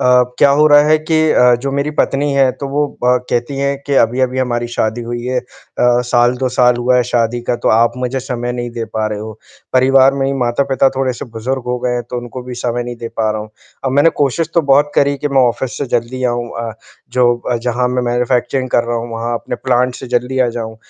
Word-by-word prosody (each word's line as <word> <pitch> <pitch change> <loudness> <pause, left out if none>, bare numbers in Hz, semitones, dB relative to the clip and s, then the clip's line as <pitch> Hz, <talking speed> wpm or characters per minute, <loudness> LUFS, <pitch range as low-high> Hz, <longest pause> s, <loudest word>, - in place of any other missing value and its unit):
अ, 125 0 +5 0.2
क्या 140 - +5
हो 150 - +6
रहा 145 0 +7
है 155 0 +4
कि 155 +1 -1
अ, 125 0 +5
जो 140 - -2
मेरी 140 +2 -1
पत्नी 145 -1 0
है, 135 -1 +3
तो 140 - -6
वो 145 +2 0 0.2
ब 125 0 +4
कहती 120 +4 -1
हैं 140 0 0
कि 140 - 0
अभी-अभी 130 +2 0
हमारी 120 -2 -1
शादी 110 +2 -1
हुई 120 0 -5
है 125 0 -1
अ, - - -23 0.4
साल 120 0 +3
2 130 - 0
साल 125 -1 +3
हुआ 125 +1 +2
है 125 - +4
शादी 120 0 0
का, 120 - +1
तो - - -1
आप 115 +1 +3
मुझे 125 +1 -2
समय 120 -2 -4
नहीं 120 0 -4
दे 115 -1 -4
पा 110 -1 -3
रहे 105 -1 -4
हो, 110 +1 -7 0.4
परिवार 135 +1 +4
में 135 -1 -1
ही 135 - 0
माता-पिता 135 +2 +2
थोड़े-से 130 -2 -2
बुज़ुर्ग 125 +3 -3
हो 125 0 -1
गए 125 - +1
हैं, 120 - -2
तो - - -3
उनको 120 +1 -7
भी 125 0 -7
समय 120 0 -2
नहीं 120 0 -6
दे 115 0 -6
पा 110 -1 +1
रहा 110 0 -3
हूँ। 105 0 -9 0.3
अब 135 - 0
मैंने 145 +4 +4
कोशिश 145 +4 0
तो 170 - +5
बहुत 145 +2 +4
करी 140 0 +2
कि 145 - -2
मैं 135 -1 +3
ऑफ़िस 130 +2 -4
से 140 - -2
जल्दी 120 +2 -4
आऊँ 120 -1 -1
अ, 115 -1 -4 0.4
जो 120 -1 +3
अ, 120 - +1
जहाँ 125 +1 -1
मैं 125 0 -1
मैन्युफैक्चरिंग 125 +1 0
कर 120 - +2
रहा 120 0 -2
हूँ, 115 +1 -5
वहाँ 115 +1 -3
अपने - - -5
प्लांट 125 0 +1
से 130 - -8
जल्दी 125 +2 -2
आ 125 - +3
जाऊँ। 110 -1 -6
125 Hz, 245 wpm, -16 LUFS, 120-135 Hz, 0.4 s, रहा